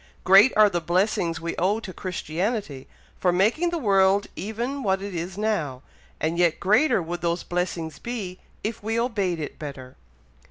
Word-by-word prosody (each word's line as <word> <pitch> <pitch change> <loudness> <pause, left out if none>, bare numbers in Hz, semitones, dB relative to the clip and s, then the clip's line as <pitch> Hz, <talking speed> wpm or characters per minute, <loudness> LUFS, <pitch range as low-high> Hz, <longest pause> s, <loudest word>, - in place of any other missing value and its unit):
Great 195 +7 +7
are 215 -1 +8
the 175 -4 -1
blessings 175 -1 0
we 165 +1 -4
owe 200 +5 +1
to 190 -5 -8
Christianity, 180 - -3 0.3
for 180 - +3
making 220 - +2
the 340 - -2
world 200 -5 +3
even 235 +8 -4
what 190 -5 +1
it 200 0 -6
is 175 +2 -4
now, 165 -12 -1 0.4
and 165 +2 -1
yet 170 -2 +3
greater 215 - +3
would 175 +2 -5
those 170 0 -1
blessings 170 -4 -3
be, 205 -7 -5 0.2
if 215 +1 -3
we 225 +2 -1
obeyed 200 -8 -1
it 150 - -6
better." 135 -4 -8
190 Hz, 165 wpm, -25 LUFS, 170-215 Hz, 0.4 s, are